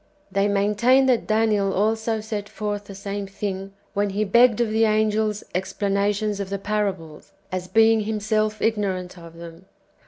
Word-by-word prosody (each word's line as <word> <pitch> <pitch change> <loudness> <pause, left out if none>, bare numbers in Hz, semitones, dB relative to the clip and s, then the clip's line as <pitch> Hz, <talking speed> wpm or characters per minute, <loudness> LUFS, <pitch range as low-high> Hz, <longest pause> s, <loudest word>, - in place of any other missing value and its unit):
They 200 +1 +2
maintain 210 +6 +3
that 255 -3 +2
Daniel 215 -3 +2
also 220 +2 0
set 210 -1 -5
forth 205 -1 -4
the 200 - -10
same 200 0 -5
thing 195 -1 -5 0.2
when 205 -1 0
he 200 +2 -1
begged 235 +3 +4
of 235 -2 +1
the 225 +1 +3
angels 215 -1 +1
explanations 200 +2 -1
of 195 -1 -4
the 200 - -2
parables, 195 -4 -3 0.2
as 185 0 -3
being 225 +2 +4
himself 215 0 -1
ignorant 195 -5 -1
of 165 -1 -13
them. 170 +1 -11
205 Hz, 155 wpm, -23 LUFS, 195-215 Hz, 0.2 s, begged